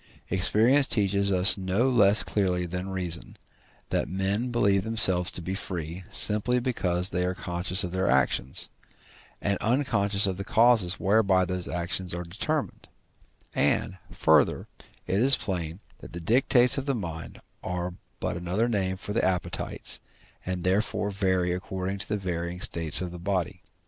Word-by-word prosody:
Experience 115 Hz, +9 st, +4 dB
teaches 100 Hz, -2 st, +1 dB
us 95 Hz, +2 st, +6 dB
no 95 Hz, +7 st, 0 dB
less 105 Hz, -5 st, +4 dB
clearly 90 Hz, -3 st, -1 dB
than 90 Hz, +2 st, -5 dB
reason, 90 Hz, -3 st, -3 dB, 0.5 s
that -, -, 0 dB
men 100 Hz, +6 st, -2 dB
believe 100 Hz, -5 st, +1 dB
themselves 95 Hz, -5 st, +3 dB
to 90 Hz, -, -3 dB
be 95 Hz, -, -4 dB
free, 90 Hz, -2 st, -5 dB
simply 110 Hz, +4 st, +5 dB
because 90 Hz, -8 st, -1 dB
they 90 Hz, +1 st, -1 dB
are 90 Hz, +1 st, -2 dB
conscious 90 Hz, +4 st, -2 dB
of 90 Hz, -, -4 dB
their 95 Hz, +1 st, -1 dB
actions, 65 Hz, -1 st, +1 dB, 0.7 s
and 100 Hz, 0 st, -1 dB
unconscious 105 Hz, -4 st, +1 dB
of 95 Hz, -2 st, -2 dB
the 100 Hz, -, -5 dB
causes 110 Hz, -4 st, +3 dB
whereby 95 Hz, -2 st, +2 dB
those 90 Hz, 0 st, -3 dB
actions 90 Hz, +3 st, -3 dB
are 90 Hz, -, -5 dB
determined; 135 Hz, -, -4 dB, 0.7 s
and, 95 Hz, -, 0 dB
further, 80 Hz, -5 st, +2 dB, 0.4 s
it 95 Hz, -, -1 dB
is 135 Hz, +3 st, +5 dB
plain 85 Hz, -3 st, -4 dB, 0.2 s
that -, -, -12 dB
the 85 Hz, -, -5 dB
dictates 125 Hz, +6 st, +2 dB
of 135 Hz, -, -7 dB
the 140 Hz, -, 0 dB
mind 85 Hz, -7 st, -7 dB, 0.2 s
are 90 Hz, 0 st, -4 dB, 0.3 s
but -, -, -3 dB
another 90 Hz, +7 st, -1 dB
name 95 Hz, -5 st, -1 dB
for 105 Hz, -, -6 dB
the 115 Hz, -, 0 dB
appetites, 90 Hz, -1 st, -2 dB, 0.4 s
and 90 Hz, -1 st, -4 dB
therefore 100 Hz, +2 st, 0 dB
vary 95 Hz, -2 st, 0 dB
according 95 Hz, +2 st, -4 dB
to 95 Hz, -, -6 dB
the 105 Hz, -, -1 dB
varying 90 Hz, -2 st, -4 dB
state 85 Hz, -3 st, +1 dB
of 90 Hz, -1 st, -4 dB
the 90 Hz, -, -9 dB
body. 90 Hz, -1 st, -3 dB
95 Hz, 155 wpm, -26 LUFS, 90-105 Hz, 0.7 s, us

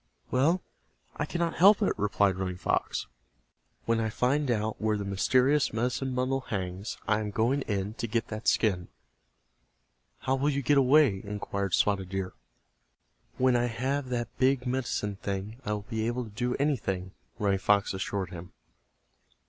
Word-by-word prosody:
"Well, 155 Hz, +8 st, +2 dB, 0.5 s
I -, -, -1 dB
cannot 170 Hz, -1 st, -1 dB
help 200 Hz, +4 st, +7 dB
it," -, -, +2 dB
replied 100 Hz, -1 st, +2 dB
Running 90 Hz, -1 st, -3 dB
Fox. -, -, -1 dB, 0.8 s
"When 115 Hz, 0 st, +2 dB
I 110 Hz, -1 st, 0 dB
find 135 Hz, +5 st, +1 dB
out 110 Hz, -2 st, -1 dB
where 110 Hz, -1 st, +1 dB
the 100 Hz, -, -4 dB
mysterious 130 Hz, +9 st, +2 dB
medicine 125 Hz, +3 st, -1 dB
bundle 130 Hz, +1 st, +1 dB
hangs 95 Hz, -2 st, -4 dB
I 110 Hz, -1 st, +3 dB
am 105 Hz, -1 st, -3 dB
going 120 Hz, +7 st, +1 dB
in 100 Hz, 0 st, -2 dB
to 115 Hz, -, -1 dB
get 115 Hz, 0 st, -1 dB
that 110 Hz, +1 st, -5 dB
skin." 95 Hz, -6 st, +2 dB, 1.3 s
"How 130 Hz, -, 0 dB
will 135 Hz, +2 st, +1 dB
you 140 Hz, -1 st, -1 dB
get 145 Hz, +3 st, +4 dB
away?" 135 Hz, -6 st, +4 dB
inquired 100 Hz, -2 st, -2 dB
Spotted 95 Hz, -3 st, +1 dB
Deer. 95 Hz, -1 st, -3 dB, 1.0 s
"When 130 Hz, -1 st, +3 dB
I 120 Hz, 0 st, +2 dB
have 130 Hz, +3 st, -2 dB
that 120 Hz, -2 st, -3 dB
big 130 Hz, 0 st, +3 dB
medicine 120 Hz, -5 st, -2 dB
thing 100 Hz, +3 st, -4 dB
I 105 Hz, -, 0 dB
will 105 Hz, -1 st, -4 dB
be 110 Hz, -1 st, -2 dB
able 120 Hz, +1 st, -1 dB
to 110 Hz, -, -10 dB
do 125 Hz, +4 st, -1 dB
anything," 100 Hz, -10 st, -1 dB, 0.3 s
Running 100 Hz, -2 st, +1 dB
Fox 100 Hz, +1 st, +2 dB
assured 95 Hz, -1 st, -3 dB
him. 90 Hz, 0 st, -9 dB
110 Hz, 160 wpm, -29 LUFS, 100-130 Hz, 1.3 s, help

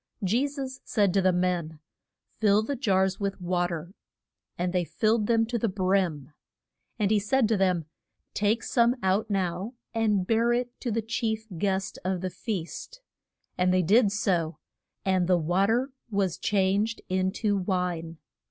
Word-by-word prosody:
Je 235 Hz, +9 st, +2 dB
sus 270 Hz, -2 st, -6 dB
said 200 Hz, -5 st, +1 dB
to 195 Hz, -, +3 dB
the 185 Hz, 0 st, +4 dB
men, 175 Hz, -3 st, -1 dB, 0.6 s
Fill 210 Hz, -1 st, +4 dB
the 280 Hz, +6 st, -2 dB
jars 190 Hz, -6 st, +1 dB
with 200 Hz, -1 st, -2 dB
wa 175 Hz, 0 st, 0 dB
ter. 170 Hz, +1 st, -6 dB, 0.6 s
And 180 Hz, +1 st, -1 dB
they 180 Hz, -1 st, +2 dB
filled 215 Hz, +4 st, +1 dB
them 225 Hz, -1 st, +3 dB
to 235 Hz, +1 st, -2 dB
the 230 Hz, -, +1 dB
brim. 185 Hz, -7 st, 0 dB, 0.6 s
And 210 Hz, -2 st, +1 dB
he 215 Hz, -, +4 dB
said 225 Hz, +4 st, +2 dB
to 225 Hz, -, +3 dB
them, 185 Hz, -4 st, +1 dB, 0.5 s
Take 215 Hz, +3 st, +1 dB
some 240 Hz, 0 st, +3 dB
out 195 Hz, +4 st, +1 dB
now 190 Hz, +3 st, -2 dB, 0.2 s
and 215 Hz, -4 st, +1 dB
bear 230 Hz, +3 st, +2 dB
it 245 Hz, 0 st, -1 dB
to 245 Hz, -, -3 dB
the 225 Hz, 0 st, -1 dB
chief 220 Hz, -1 st, -2 dB
guest 190 Hz, +2 st, -1 dB
of 185 Hz, -1 st, -1 dB
the 185 Hz, -1 st, -3 dB
feast. 215 Hz, -, -5 dB, 0.6 s
And 180 Hz, 0 st, +3 dB
they 185 Hz, 0 st, +3 dB
did 205 Hz, +4 st, +4 dB
so; 175 Hz, -6 st, 0 dB, 0.5 s
and 185 Hz, -2 st, +2 dB
the 180 Hz, -1 st, +4 dB
wa 175 Hz, +4 st, +2 dB
ter 245 Hz, +5 st, +1 dB, 0.2 s
was 195 Hz, -5 st, 0 dB
changed 205 Hz, +3 st, +1 dB
in 185 Hz, 0 st, 0 dB
to 210 Hz, -2 st, 0 dB
wine. 180 Hz, -4 st, -2 dB
195 Hz, 165 wpm, -27 LUFS, 180-225 Hz, 0.6 s, the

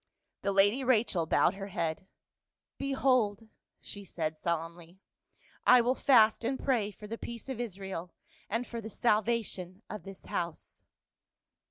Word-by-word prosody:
The 200 Hz, -, 0 dB
lady 205 Hz, +7 st, +4 dB
Rachel 220 Hz, -9 st, +2 dB
bowed 170 Hz, -, +4 dB
her 195 Hz, 0 st, -6 dB
head. 170 Hz, -1 st, -3 dB, 0.4 s
" -, -, -62 dB
Behold 245 Hz, -6 st, +2 dB, 0.2 s
!" -, -, -57 dB
she 200 Hz, -, -7 dB
said, 160 Hz, -4 st, -3 dB
solemnly, 170 Hz, +2 st, -4 dB, 0.4 s
" -, -, -42 dB, 0.3 s
I 250 Hz, -, +9 dB
will 245 Hz, +2 st, +2 dB
fast 235 Hz, -5 st, +5 dB
and 260 Hz, +3 st, 0 dB
pray 235 Hz, -7 st, +1 dB
for 210 Hz, 0 st, -12 dB
the 230 Hz, +2 st, -6 dB
peace 235 Hz, +1 st, -7 dB
of 260 Hz, -3 st, -4 dB
Israel, 190 Hz, -5 st, -5 dB, 0.4 s
and 230 Hz, +4 st, -1 dB
for 235 Hz, -1 st, -6 dB
the 220 Hz, -, -7 dB
salvation 215 Hz, -4 st, 0 dB
of 210 Hz, -, -5 dB
this 195 Hz, -1 st, -11 dB
house." 170 Hz, -2 st, -4 dB
205 Hz, 155 wpm, -31 LUFS, 180-235 Hz, 0.4 s, I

